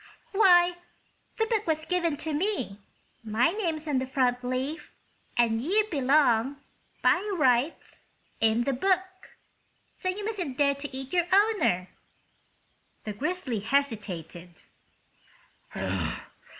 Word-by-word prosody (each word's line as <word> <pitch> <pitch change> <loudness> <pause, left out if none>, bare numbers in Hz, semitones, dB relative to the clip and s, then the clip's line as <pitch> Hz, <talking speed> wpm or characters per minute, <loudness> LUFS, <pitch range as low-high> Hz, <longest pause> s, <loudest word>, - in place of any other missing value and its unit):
"Why, 355 -4 +5 0.6
the 445 - +2
book 440 -3 -1
was 315 -1 0
given 340 -4 0
to 315 - -2
me; 295 - -1 0.4
my 225 +6 +2
name's 330 -6 -3
on 280 -3 +1
the 260 - -3
front 250 -2 +1
leaf. 260 +6 -3 0.5
And 230 -1 +2
you 405 - +2
belong, 275 -3 +3 0.5
by - - +5 0.2
rights, 265 -1 0 0.3
in 225 +1 +3
the 275 - 0
book. 375 +6 -1 0.6
So 370 - -3
you 405 +3 -3
mustn't 365 - -3
dare 280 -1 +3
to 280 +1 -7
eat 270 +2 -7
your 350 -1 +2
owner!" 390 - +3 1.1
The 210 - -4
Grizzly 280 - -2
hesitated. 200 - -3
285 Hz, 115 wpm, -27 LUFS, 245-360 Hz, 1.1 s, Why